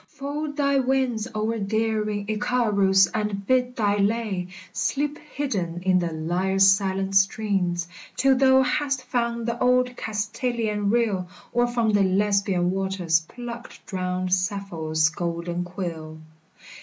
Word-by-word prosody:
fold 290 +1 -5
thy 280 -1 +2
wings 255 -4 0
O'er 220 +1 -1
daring 215 0 -1
Icarus 210 -4 +3
and 210 -2 -2
bid 250 +1 +1
thy 205 -3 +1
lay 200 -3 0 0.3
Sleep 295 +1 -1
hidden 195 - -4
in 185 -1 +3
the 170 -1 -2
lyre's 185 +5 +2
silent 195 0 +1
strings, 195 -3 +1 0.3
Till 270 0 +4
thou 265 0 +5
hast 275 -1 -1
found 235 -2 -1
the 235 0 -2
old 250 0 +2
Castaliah 220 0 -2
rill, 205 -4 +1 0.2
Or 240 0 +3
from 235 -2 +1
the 205 -1 +3
Lesbian 195 -2 +2
waters 190 -4 +1
plucked 240 0 -9
drowned 185 -1 -2
Sappho's 180 -5 0
golden 170 +2 -3
quill 170 -4 -6
205 Hz, 125 wpm, -24 LUFS, 185-240 Hz, 0.3 s, thou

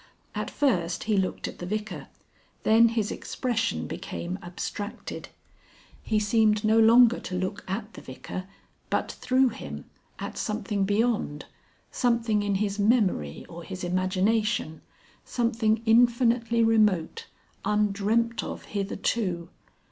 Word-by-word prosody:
At - - -3
first 180 -12 0
he 215 -1 +1
looked 190 -2 -1
at - - -9
the 175 - -5
Vicar, 215 +2 -4 0.6
then 225 +2 +6
his 225 -3 -1
expression 230 -3 -2
became 180 +3 -5
abstracted. 180 +4 -6 0.7
He 215 - 0
seemed 215 0 +3
no 220 +1 +4
longer 235 +2 +6
to 180 - -6
look 185 +2 -3
at 205 +3 -4
the - - -10
Vicar, 130 +8 -7 0.4
but - - 0
through 255 +1 +2
him, 225 - -8 0.3
at - - -6
something 210 -2 -1
beyond, 205 -7 0 0.5
something 235 -4 +1
in 205 -1 0
his 200 +1 -1
memory 200 - +1
or 170 0 -9
his 185 +1 -7
imagination, 185 0 0 0.4
something 230 -2 0
infinitely 235 0 +4
remote, 220 - +2 0.4
undreamt 210 +3 +1
of - - -6
hitherto.... 195 -3 -1
215 Hz, 120 wpm, -27 LUFS, 190-230 Hz, 0.7 s, then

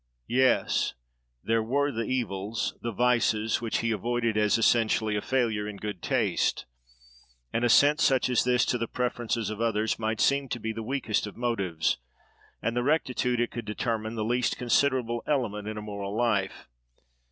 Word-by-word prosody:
Yes! 130 +1 +2 0.5
there 115 0 +1
were 140 +6 0
the 115 -2 -3
evils, 105 -3 -2
the 115 - -3
vices, 115 -1 +1
which 115 -2 -1
he 115 0 0
avoided 115 0 -1
as, 105 0 +3
essentially, 110 -2 +2
a 105 - -1
failure 115 -5 0
in 105 -1 -6
good 105 -3 -6
taste. - - 0 0.9
An 115 - 0
assent, 145 +6 +5
such 135 -5 +3
as 125 -2 +2
this, 125 0 +3
to 125 - 0
the 115 - -2
preferences 120 -3 -2
of 110 +1 -5
others, 110 -1 0
might 110 0 -1
seem 140 -1 +2
to 120 - -3
be 110 0 -3
the 115 - -5
weakest 110 -3 -1
of 105 - -10
motives, 100 -9 0 0.7
and 115 - -1
the 120 - +1
rectitude 125 -3 +1
it 120 - 0
could 120 -2 -6
determine 110 +1 -2
the 110 -1 -2
least 120 +1 0
considerable 125 -2 +1
element 105 -8 -1
in 110 0 -4
a 105 - -5
moral 100 -1 -5
life. 110 -5 0
115 Hz, 170 wpm, -27 LUFS, 110-125 Hz, 0.9 s, assent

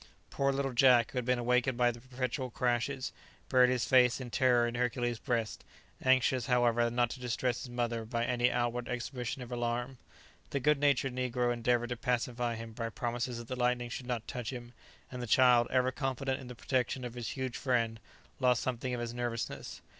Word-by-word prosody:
Poor 140 0 +1
little 135 -1 -1
Jack, 125 -2 +5
who 130 - -1
had 125 - -4
been 125 0 +2
awakened 125 +1 +1
by 120 -1 +4
the 120 0 -12
perpetual 130 +1 -3
crashes, 125 +3 -1 0.4
buried 125 -1 +5
his 125 -2 +1
face 125 -2 +4
in 125 -2 -7
terror 125 -2 +3
in 120 - -2
Hercules' 120 -1 -1
breast, 115 -4 -2 0.4
anxious, 130 -1 +3
however, 120 -1 +3
not 120 0 +1
to 130 - -7
distress 125 0 -1
his 130 - -7
mother 120 -1 -2
by 115 +1 -2
any 125 0 +2
outward 120 0 -1
exhibition 125 +1 -4
of 125 - -11
alarm. 120 +1 -2 0.5
The 140 - -1
good 150 +2 +3
natured 140 -2 +2
negro 125 -1 0
endeavoured 120 0 +1
to 125 - -3
pacify 120 -1 -1
him 115 0 -8
by 115 0 -3
promises 120 +1 -3
that 120 -1 -8
the 130 - -3
lightning 125 -1 0
should 125 +1 -6
not 120 -3 -3
touch 125 -2 -4
him, 120 -2 -8 0.4
and 125 -1 -5
the 120 - -4
child, 125 0 +5
ever 130 0 +2
confident 135 -1 -2
in 130 - -10
the 125 - -8
protection 130 +1 -1
of 120 - -6
his 120 -3 -5
huge 130 -2 -3
friend, 115 -4 0 0.4
lost 125 -2 +3
something 125 0 -2
of 120 - -4
his 120 0 -4
nervousness. 120 -2 -4
125 Hz, 200 wpm, -32 LUFS, 120-130 Hz, 0.5 s, Jack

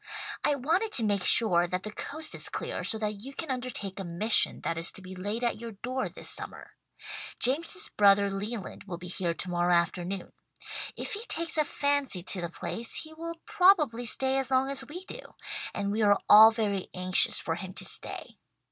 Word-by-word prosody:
"I 290 - +2
wanted 335 - -1
to 235 - +2
make 200 -3 0
sure 175 -6 +6
that 180 +2 -4
the 215 - -6
coast 310 +8 -4
is - - +3
clear, - - -5
so 220 - +3
that 210 -1 -4
you 275 +2 -8
can 320 -5 -5
undertake 250 -7 -5
a - - -4
mission 185 +6 +4
that 165 - -3
is 165 0 +4
to - - -2
be 185 0 -10
laid 205 +6 -4
at 235 -2 -1
your 230 -1 -7
door 255 +6 -4
this - - -5
summer. - - 0 0.7
Jameson's 335 - +2
brother 200 -1 +3
Leland 205 +1 -6
will 180 -3 -7
be 180 +1 -10
here 175 -1 -2
to 180 - -1
morrow 175 0 0
afternoon. 175 +2 -2 0.7
If - - -4
he 420 +2 -4
takes 330 0 -1
a 305 - +3
fancy 285 - -1
to 185 0 +1
the 170 - -4
place 225 +6 -5
he 315 0 -11
will 335 +1 -7
probably 355 - +3
stay 265 +3 +3
as 270 - -1
long 265 +1 +1
as 275 - -2
we 360 +5 -9
do, - - -4 0.5
and 200 -1 -3
we 215 +2 -2
are 205 -1 +3
all 215 +1 +9
very 210 -4 -3
anxious 185 0 +3
for 165 - -3
him 185 +2 -7
to - - -2
stay. - - -2
220 Hz, 200 wpm, -28 LUFS, 190-275 Hz, 0.7 s, all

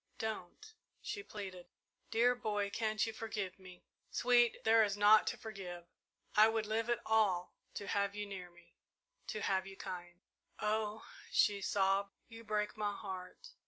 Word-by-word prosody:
"Don't!" 220 - -5 0.3
she 410 - -5
pleaded. 190 - -8 0.4
"Dear 235 +2 +4
boy, 205 -4 -1
can't 215 -1 0
you 225 - -4
forgive 210 -5 -4
me?" 185 -1 -13 0.3
"Sweet, 240 -1 +3
there 225 0 +6
is 205 -1 0
naught 210 +1 +7
to - - -1
forgive. 185 -5 -7 0.5
I 215 +1 +8
would 225 -1 0
live 220 +2 -1
it 240 - +2
all 200 -5 +2 0.2
to 205 - -4
have 200 0 0
you 210 0 -3
near 190 -3 -7
me 175 0 -21 0.5
to 215 - -3
have 190 -1 +1
you 195 0 -10
kind." 175 -2 -7 0.4
"Oh," 215 0 -1 0.3
she 200 -1 +3
sobbed, 195 0 +1
"you 230 -1 -11
break 210 -1 -1
my 205 -1 -1
heart!" 190 - -7
210 Hz, 160 wpm, -35 LUFS, 190-220 Hz, 0.5 s, I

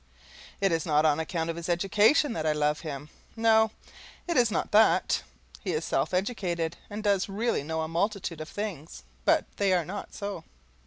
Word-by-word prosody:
It 195 -2 +3
is 165 -1 +1
not 155 -1 +2
on 150 0 +3
account 165 0 -2
of - - -7
his 170 +1 -6
education 205 - +3
that 160 -7 -2
I 155 - +3
love 150 0 +1
him 150 -2 -7 0.2
no, 220 -1 +4 0.6
it 340 - -1
is 240 -4 +4
not 215 - -2
that. 215 +2 +4 0.4
He 185 - -1
is 155 +1 -1
self 135 +4 0
educated, 180 -4 -1
and 210 +1 -6
does 200 -2 +2
really 220 +1 0
know 160 +2 -2
a - - -3
multitude 175 -1 -2
of 155 - -7
things, 165 - -6 0.2
but - - +4
they 200 -2 +2
are 175 -3 +2
not 200 +5 -7
so. 200 -5 -5
175 Hz, 190 wpm, -28 LUFS, 160-205 Hz, 0.6 s, no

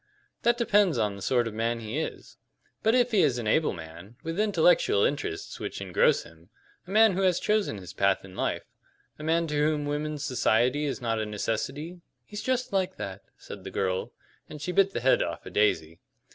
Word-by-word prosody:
"That 235 0 +3
depends 205 - +3
on 105 -3 0
the 100 - -10
sort 120 +3 +1
of 110 - -5
man 115 +2 -1
he 115 +6 -4
is. 160 - -6 0.4
But 220 +2 +3
if 245 -1 +3
he 210 -4 +4
is 140 -6 +2
an 120 - -4
able 155 +9 +2
man, 85 +5 -10
with 165 +4 -4
intellectual 175 - +3
interests 140 - -2
which - - -5
engross - - +2
him 80 +2 -18 0.4
a - - -13
man 215 +1 +5
who 190 - -1
has 185 -3 +3
chosen 210 - 0
his 90 -2 -10
path 100 -1 +1
in 95 -1 -13
life - - -1 0.6
a - - -7
man 165 +2 +2
to 150 - -5
whom 150 0 +1
women's 150 0 -3
society 125 +3 +2
is 140 -2 -3
not 115 -2 -1
a 110 - -1
necessity 135 - -3
" - - -51
"He's 210 0 -7
just 255 -3 -1
like 190 -1 0
that," 95 0 -6 0.2
said - - -10
the - - -6
girl, 95 -1 -2 0.4
and 150 - -8
she 155 +5 -3
bit 195 +2 +4
the 195 - -4
head 130 +2 +4
off - - -3
a - - -8
daisy. 80 -6 +1
145 Hz, 210 wpm, -27 LUFS, -, 0.6 s, man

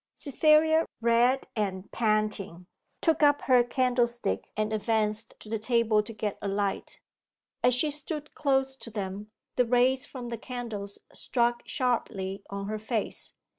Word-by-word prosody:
Cytherea, 315 +3 +4
red 235 +3 +3
and 195 -3 -2
panting, 215 -5 -1 0.4
took 320 -2 +2
up 290 -1 +4
her 250 -2 +5
candlestick 240 - 0
and 215 0 0
advanced 215 0 0
to - - -11
the 220 0 -2
table 225 -1 +3
to 210 - -9
get 215 -2 -4
a - - -3
light. 200 0 -2 0.6
As 250 0 +4
she 300 +4 +3
stood 300 0 -5
close 270 -2 +1
to 230 - -9
them 205 -1 -5 0.3
the 250 - +4
rays 255 +3 +3
from 245 -3 -7
the 235 -2 -5
candles 225 -6 -6 0.2
struck 240 -1 0
sharply 200 -7 -1
on 200 0 -4
her 215 +1 -3
face. 220 0 -3
235 Hz, 145 wpm, -28 LUFS, 210-255 Hz, 0.6 s, her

